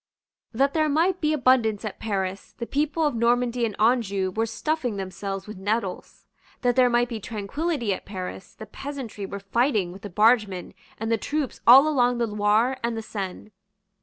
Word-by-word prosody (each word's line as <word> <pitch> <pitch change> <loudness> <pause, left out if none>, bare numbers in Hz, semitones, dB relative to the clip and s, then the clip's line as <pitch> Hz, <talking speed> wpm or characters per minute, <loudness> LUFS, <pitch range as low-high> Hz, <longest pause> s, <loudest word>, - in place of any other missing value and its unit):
That 275 +4 +1
there 310 -1 +2
might 345 +5 +1
be 305 -1 +2
abundance 250 -7 +2
at 210 - -6
Paris, 195 -2 -3
the 235 - -4
people 300 +4 0
of 295 - +1
Normandy 240 +1 +1
and 210 - -8
Anjou 210 -5 +2
were 225 +4 -1
stuffing 250 -2 -2
themselves 195 0 -5
with 215 -2 -9
nettles. 205 -1 -3 0.4
That 245 -1 +2
there 255 -1 +5
might 240 0 +2
be 230 -2 -5
tranquillity 230 - -2
at - - -6
Paris, 185 -1 -7
the 220 - -9
peasantry 235 -4 -7
were 200 - -6
fighting 210 -2 0
with 190 +2 -11
the 205 - -7
bargemen 210 -2 +2 0.2
and 225 +1 -3
the 225 - +2
troops 295 0 -3
all 265 +5 +9
along 245 -5 +2
the 235 - +1
Loire 210 +4 +1
and 235 -1 -1
the 225 - -4
Seine. 200 0 -6
230 Hz, 180 wpm, -25 LUFS, 200-255 Hz, 0.4 s, all